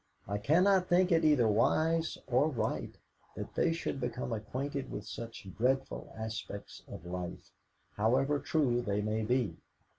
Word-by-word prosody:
I 100 +1 -1
cannot 180 - +4
think 180 +1 +4
it 165 -1 +4
either 145 -7 +5
wise 160 +9 +2
or 130 +5 +3
right 130 - -2 0.4
that - - -6
they 165 - +2
should 165 -4 -3
become 125 0 -2
acquainted 130 +6 -3
with - - -5
such 115 -4 -7
dreadful 130 +4 0
aspects 110 -2 -6
of - - -9
life, 90 0 -6 0.5
however 135 +7 +2
true 130 -5 +1
they 105 -2 -1
may 110 +1 0
be. 120 0 0
125 Hz, 145 wpm, -32 LUFS, 110-155 Hz, 0.5 s, either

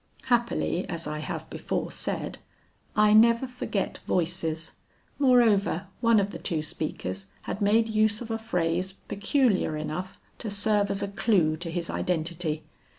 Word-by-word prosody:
Happily 235 -7 0
as 165 -1 -3
I 150 0 -3
have 155 - -5
before - - -3
said, - - -3 0.6
I 210 0 +5
never 230 +3 +6
forget 250 -5 -3
voices; 165 -2 0 0.5
moreover 225 - +4
one 230 -2 +5
of 200 0 0
the - - -7
two 160 -5 -2
speakers 95 - -4 0.2
had 200 - -4
made 220 +3 +4
use 215 -1 +2
of 235 -2 -6
a 225 - -1
phrase 180 -3 -1
peculiar 200 - +1
enough 155 +5 -4 0.2
to 225 - -4
serve 205 0 +2
as 200 0 -1
a - - -1
clue 195 -5 +2
to 170 +1 -5
his 170 0 -3
identity. 165 -2 -1
195 Hz, 150 wpm, -27 LUFS, 165-220 Hz, 0.6 s, never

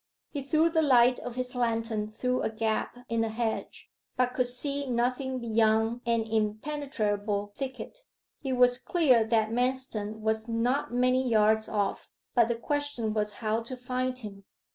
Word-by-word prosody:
He 285 - -3
threw 315 +4 +2
the 320 -1 +3
light 250 -4 +5
of 245 -1 -6
his 250 0 -3
lantern 230 -3 -1
through 250 +4 -1
a - - 0
gap 220 +2 -2
in 230 0 0
the 225 - 0
hedge, 225 0 -3 0.3
but 250 0 +2
could 250 -1 +1
see 280 +3 -2
nothing 255 +2 0
beyond 225 0 +2
an 230 -1 +2
impenetrable 215 -2 -1
thicket. 260 - -6 0.4
It 265 -2 -1
was 250 0 +4
clear 265 -8 +3
that 220 -1 +1
Manston 240 -4 -1
was 220 +1 -1
not 235 +5 0
many 255 +1 +2
yards 220 0 +3
off, 205 -2 -2 0.2
but 235 -3 +4
the 235 - 0
question 290 -3 -2
was 210 -1 -1
how 220 +1 +1
to 255 +3 -5
find 255 +1 -2
him. 200 -5 -8
235 Hz, 160 wpm, -28 LUFS, 220-255 Hz, 0.4 s, light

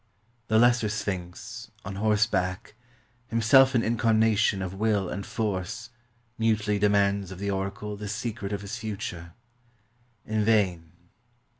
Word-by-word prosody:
The 110 - +3
lesser 120 -1 +4
Sphinx, 100 +5 -5 0.2
on 100 -1 -5
horseback, 105 -4 0 0.5
himself 130 +4 +5
an 115 - +3
incarnation 110 -3 +2
of 95 0 -4
will 105 -1 +1
and 100 - -4
force, 105 +2 -3 0.5
mutely 105 -2 +1
demands 100 -1 +2
of 95 - -8
the 100 +1 -2
oracle 100 +2 -3
the 105 0 -7
secret 105 -1 -4
of 100 -1 -3
his 100 -1 -5
future. 90 -6 -6 0.9
In 110 0 0
vain. 95 -7 +1
105 Hz, 125 wpm, -27 LUFS, 95-110 Hz, 0.9 s, himself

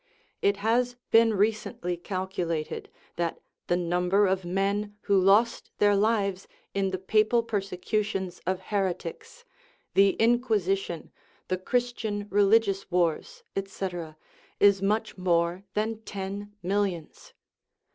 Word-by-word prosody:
It 200 0 +2
has 245 +2 +2 0.2
been 225 -1 +5
recently 200 -3 0
calculated 175 -3 -3 0.3
that 170 -1 -1 0.3
the 175 - +2
number 180 +3 +2
of 190 -1 +1
men 200 +3 -1
who 200 -2 +3
lost 205 +5 +3
their 205 0 +4
lives 200 -2 +1 0.3
in 195 -1 +1
the 190 - -2
papal 215 +5 +2
persecutions 195 -2 -2
of 185 0 0
heretics, 190 - -3 0.5
the 195 0 +5
Inquisition, 210 -7 +1 0.4
the 185 - +1
Christian 225 -2 -1
religious 200 -1 +3
wars, 180 - 0
etc., 180 -5 -4 0.4
is 200 -1 +5
much 210 0 0
more 175 +1 +1
than 220 +1 -1
ten 200 0 -6
millions. 185 -4 -2
195 Hz, 110 wpm, -27 LUFS, 185-215 Hz, 0.5 s, been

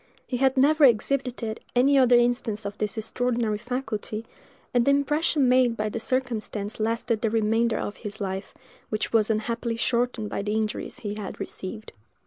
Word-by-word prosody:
He 250 - -2
had 265 +1 +2
never 300 +3 +4
exhibited 245 -2 +2 0.2
any 270 +3 +5
other 255 -2 +6
instance 240 -3 +1
of 200 0 -4
this 210 +1 -1
extraordinary 230 -1 -1
faculty, 230 -3 -4 0.5
and 245 -1 +4
the 275 - +2
impression 285 0 +2
made 250 -2 +4
by 215 0 -1
the 230 - -4
circumstance 225 -5 -2
lasted 225 0 0
the 225 - +1
remainder 225 +1 +2
of 205 - -4
his 210 -1 -7
life, 195 -1 -4 0.3
which 215 +1 -2
was 220 -1 +4
unhappily 230 +1 -1
shortened 235 -2 0
by - - -2
the 205 +1 -2
injuries 215 -1 -3
he 205 -2 -3
had 210 -3 -6
received. 215 +3 -7
230 Hz, 165 wpm, -26 LUFS, 215-250 Hz, 0.5 s, other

